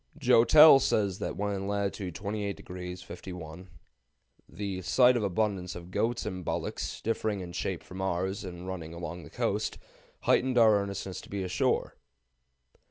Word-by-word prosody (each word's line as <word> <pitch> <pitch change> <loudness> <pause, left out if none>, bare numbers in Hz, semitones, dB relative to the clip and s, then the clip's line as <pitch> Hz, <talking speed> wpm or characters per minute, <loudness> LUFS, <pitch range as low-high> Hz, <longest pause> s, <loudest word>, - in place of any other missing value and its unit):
Joutel 140 +5 +8
says 100 -6 +1
that - - -4
when 100 0 -1
in 95 0 -3
latitude 100 -3 -2
28° 95 -3 -5
51' 90 -1 -9 0.8
"the 95 0 -4
sight 125 +7 +5
of 120 - +1
abundance 95 -2 -1
of 90 +1 -9
goats 115 +4 0
and 95 -3 -4
bullocks, - - -3
differing 110 -2 -1
in 90 -2 -7
shape 90 0 -3
from 95 +1 -8
ours, 95 +1 -1
and 90 -1 -8
running 85 -3 -6
along 85 +1 -6
the 75 - -12
coast, - - -1 0.4
heightened 130 0 +2
our 110 -3 +6
earnestness 100 -1 -5
to - - -15
be 100 -1 -3
ashore." 90 0 0
95 Hz, 150 wpm, -29 LUFS, 90-105 Hz, 0.8 s, Joutel